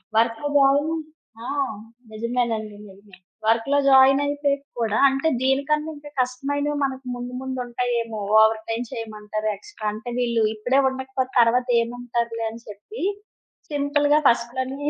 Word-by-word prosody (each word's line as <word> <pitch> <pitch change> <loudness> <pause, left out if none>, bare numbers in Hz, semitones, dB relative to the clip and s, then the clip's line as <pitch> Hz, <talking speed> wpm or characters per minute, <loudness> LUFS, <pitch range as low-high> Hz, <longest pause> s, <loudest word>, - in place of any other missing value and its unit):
వర్క్‌లో 230 +4 +2
జాయినై 285 +3 +4 0.5
ఆ! - - -7 0.7
నిజమేనండి. 225 -1 -2
నిజమే. 195 0 -16 0.3
వర్క్‌లో 230 +6 +2
జాయినైపోయాక 280 +1 +4 0.2
కూడా 220 -2 0
అంటే 270 +4 -1
దీనికన్నా 280 +4 +1
ఇంకా 290 0 -11
కష్టమైనవి 285 +4 -1
మనకు 265 -1 -3
ముందు 245 +1 -6
ముందు 260 -1 -4
ఉంటయేమో, 235 -2 -2 0.2
ఓవర్ 220 0 +4
టైమ్ 230 +2 -2
చేయమంటారు 215 -1 -4
ఎక్స్‌ట్రా. 210 +2 -8
అంటే 235 +3 -7
వీళ్ళు 235 -2 +1
ఇప్పుడే 250 +6 +1
ఉండకపోతే 260 0 -4
తర్వాత 245 +2 +4
ఏముంటారులే 235 -1 -3
అని 230 +1 -11
చెప్పి 210 - -8 0.7
సింపుల్‌గా 290 0 +2
ఫస్ట్‌లోనే 260 +4 -1
245 Hz, 120 wpm, -23 LUFS, 230-275 Hz, 0.7 s, జాయినై